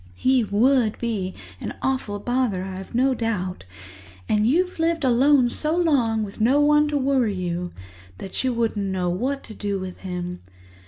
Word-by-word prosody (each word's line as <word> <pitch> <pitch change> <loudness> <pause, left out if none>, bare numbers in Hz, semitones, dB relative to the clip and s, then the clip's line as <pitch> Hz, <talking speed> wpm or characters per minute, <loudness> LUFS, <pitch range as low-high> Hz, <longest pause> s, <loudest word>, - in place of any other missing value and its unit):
"He 255 - +3
would 225 +2 +2
be 205 -6 -3 0.2
an - - -5
awful 260 -6 -1
bother, 240 -3 -1
I've 190 +2 -7
no 260 +2 +3
doubt, 205 - -3 0.6
and 210 0 +2
you've 360 +7 +1
lived 330 -1 +1
alone 260 0 +4
so 310 +2 0
long 250 -10 +2
with 205 +1 -7
no 260 +6 +4
one 295 0 +4
to 295 -1 0
worry 260 -6 +1
you 175 -1 -3 0.5
that 190 - -5
you 260 - +1
wouldn't 225 -4 -1
know 185 -2 -1
what 260 +10 -2
to 220 - -10
do 200 -1 -2
with 185 -1 -7
him. 180 -1 -5
230 Hz, 165 wpm, -23 LUFS, 195-270 Hz, 0.6 s, alone